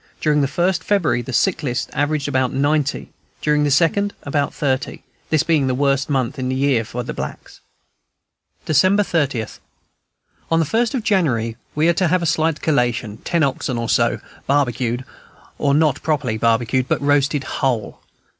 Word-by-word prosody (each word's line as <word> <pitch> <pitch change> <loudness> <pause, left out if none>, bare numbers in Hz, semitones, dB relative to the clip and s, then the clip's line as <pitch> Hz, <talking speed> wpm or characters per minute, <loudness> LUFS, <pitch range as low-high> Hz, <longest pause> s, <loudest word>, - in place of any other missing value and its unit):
During 150 -1 +2
the 140 - +2
first 175 +3 0
February 160 -13 +1
the 120 - -7
sick 170 - +1
list 125 -4 -3
averaged 145 0 0
about 130 -3 +1
ninety, 145 +1 0 0.3
during 150 0 +1
the 145 - +2
second 175 +8 +2
about 140 0 -1
thirty, 140 0 -2 0.3
this 155 -2 +2
being 155 -5 +2
the 130 - 0
worst 140 +1 +1
month 130 -2 -1
in 130 0 -2
the 130 - -1
year 135 -3 +2
for 120 +3 -5
blacks. - - -7 1.1
December 185 +7 +3
30. 140 - 0 1.0
On 165 - +2
the 165 - +2
first 230 - 0
of 245 - -2
January 130 - +1 0.2
we 155 +2 +2
are 170 - +4
to 185 +2 +1
have 180 +1 +1
a - - 0
slight 160 -1 0
collation, 120 -7 0
ten 170 +7 0
oxen 130 -2 -1
or 115 0 -2
so, - - +2 0.3
barbecued, 125 -3 0 0.5
or 140 -1 +2
not 150 -2 +2
properly 145 -7 -1
barbecued, 115 +3 +1
but - - 0
roasted 145 0 +1
whole. 125 -7 -2
145 Hz, 165 wpm, -20 LUFS, 130-160 Hz, 1.1 s, are